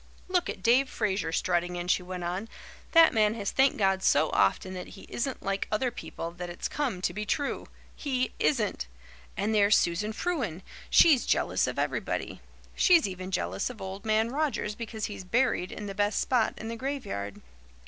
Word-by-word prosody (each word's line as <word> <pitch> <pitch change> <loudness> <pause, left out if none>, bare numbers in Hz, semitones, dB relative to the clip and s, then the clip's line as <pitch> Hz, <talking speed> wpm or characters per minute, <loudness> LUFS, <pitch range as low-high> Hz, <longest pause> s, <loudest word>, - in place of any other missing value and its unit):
"Look 365 -1 +1
at 190 - -6
Dave 255 +3 +4
Fraser 200 -6 -1
strutting 175 +1 0
in," 175 0 -4
she 185 - +2
went 180 0 -6
on. 185 +6 -3 0.4
"That 330 -1 +7
man 215 -1 +3
has 205 -3 -3
thanked 270 +1 +3
God 190 -2 +2
so 155 -3 +3
often 100 - +2
that 185 +1 -8
he - - -11
isn't 260 +2 -3
like 195 0 -1
other 240 +4 +1
people 165 -6 -6
that 175 +1 -7
it's 175 - -4
come 245 -12 -2
to 175 - 0
be 210 +3 -3
true. 280 +6 -2 0.3
He 255 -3 -1
isn't! 210 - 0 0.5
And 210 +3 0
there's 205 -1 +5
Susan 185 +6 0
Frewen. 225 - -2 0.3
She's 295 -7 +6
jealous - - +1
of - - -4
everybody. - - -2 0.3
She's 345 - +5
even 185 -1 -6
jealous 95 - -1
of 245 -3 -9
Old 190 +1 -6
Man 220 +1 +2
Rogers 285 -7 -1
because 220 -1 -5
he's 205 -2 -6
buried 205 -2 +1
in 210 - -6
the 200 - -5
best 205 +1 +1
spot 245 -4 +1
in 220 - -6
the 230 - -4
graveyard. 240 - -4
210 Hz, 185 wpm, -28 LUFS, 180-250 Hz, 0.5 s, That